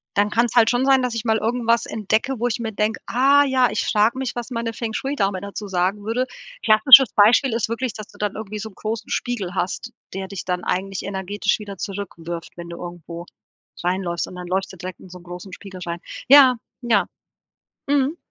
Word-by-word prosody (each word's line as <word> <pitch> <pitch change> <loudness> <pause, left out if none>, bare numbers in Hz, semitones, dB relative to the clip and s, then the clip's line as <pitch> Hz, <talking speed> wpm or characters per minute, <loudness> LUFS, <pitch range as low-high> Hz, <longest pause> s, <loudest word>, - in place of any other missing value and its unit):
dann 205 +1 +3
kann's 235 +2 +1
halt 230 -2 +6
schon 245 +2 +1
sein, 270 -1 +5
dass 250 -2 -1
ich 225 - -3
mal 220 -1 +2
irgendwas 235 0 +1
entdecke, 220 +4 -1
wo 240 - +1
ich 240 0 -2
mir 225 -1 -3
denke: 210 +2 -1
„Ah 275 +4 +4
ja, 260 -3 +3
ich 210 - -1
frage 215 +4 +2
mich, 265 -1 -3
was 240 0 -5
meine 230 -1 -3
Feng-Shui-Dame 220 -3 -2
dazu 200 +1 -6
sagen 190 +2 -1
würde.“ 230 +4 0 0.4
Klassisches 240 +3 +8
Beispiel 225 +5 +5
ist 230 -1 -1
wirklich, 235 +1 -2
dass 215 -1 -8
du - - -19
dann 210 -1 -2
irgendwie 215 0 -6
so 220 - -6
'n 195 - -21
großen 220 +2 -4
Spiegel 205 -8 -3
hast, 190 +6 -3 0.2
der 190 0 -4
dich 195 -2 -7
dann 180 -1 -2
eigentlich 195 +1 -2
energetisch 200 +2 -1
wieder 200 -2 -8
zurückwirft, 175 -5 -6
wenn 170 0 -8
du 170 - -7
irgendwo 170 -1 -8 0.6
reinläufst 180 -1 -1
und - - -10
dann 180 0 -7
läufst 190 +2 -2
du - - -12
direkt 185 +1 -7
in 185 - -14
so 180 0 -11
'nen - - -18
großen 180 +2 -9
Spiegel 190 -2 -10
rein. 170 0 -4 0.3
Ja. 270 -2 +8 0.3
Ja. 230 -4 +2 0.8
Mhm. 285 +2 +2
215 Hz, 205 wpm, -22 LUFS, 190-240 Hz, 0.8 s, Klassisches